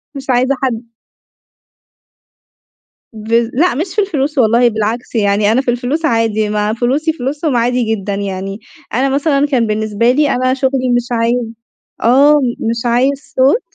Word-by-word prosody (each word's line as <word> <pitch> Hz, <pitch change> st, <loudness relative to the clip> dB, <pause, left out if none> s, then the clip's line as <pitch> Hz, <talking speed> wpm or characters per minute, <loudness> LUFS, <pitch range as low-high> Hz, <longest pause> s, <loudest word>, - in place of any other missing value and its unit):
مش 275 Hz, -1 st, -7 dB
عايزة 255 Hz, +2 st, +2 dB
حد 230 Hz, -2 st, -3 dB, 2.2 s
بالض 225 Hz, +2 st, 0 dB
لأ، 325 Hz, +3 st, +2 dB
مش 340 Hz, +7 st, -4 dB
في 420 Hz, -, +2 dB
الفلوس، 300 Hz, -6 st, -2 dB
والله، 235 Hz, 0 st, +4 dB
بالعكس 220 Hz, +3 st, -3 dB
يعني، 205 Hz, -1 st, +2 dB
أنا 245 Hz, +4 st, +2 dB
في 250 Hz, -3 st, 0 dB
الفلوس 255 Hz, +7 st, -2 dB
عادي، 225 Hz, -5 st, +1 dB
ما 210 Hz, 0 st, -1 dB
فلوسي 270 Hz, +8 st, 0 dB
فلوسهم 290 Hz, +1 st, -2 dB
عادي 245 Hz, +1 st, +1 dB
جدًا 210 Hz, -3 st, -2 dB
يعني. 195 Hz, 0 st, -4 dB, 0.3 s
أنا 265 Hz, +4 st, +1 dB
مثلًا، 280 Hz, +1 st, +1 dB
كان 245 Hz, -6 st, +1 dB
بالنسبة 215 Hz, +2 st, +1 dB
لي 290 Hz, +3 st, +2 dB
أنا 255 Hz, +1 st, +1 dB
شغلي، 265 Hz, -1 st, 0 dB
مش 245 Hz, 0 st, -1 dB
عايز 235 Hz, +1 st, 0 dB, 0.6 s
آه، 275 Hz, +5 st, +5 dB
م 240 Hz, -4 st, -2 dB
مش 230 Hz, 0 st, -2 dB
عايز 265 Hz, +4 st, 0 dB
صوت 270 Hz, -, +3 dB
245 Hz, 155 wpm, -15 LUFS, 225-275 Hz, 2.2 s, آه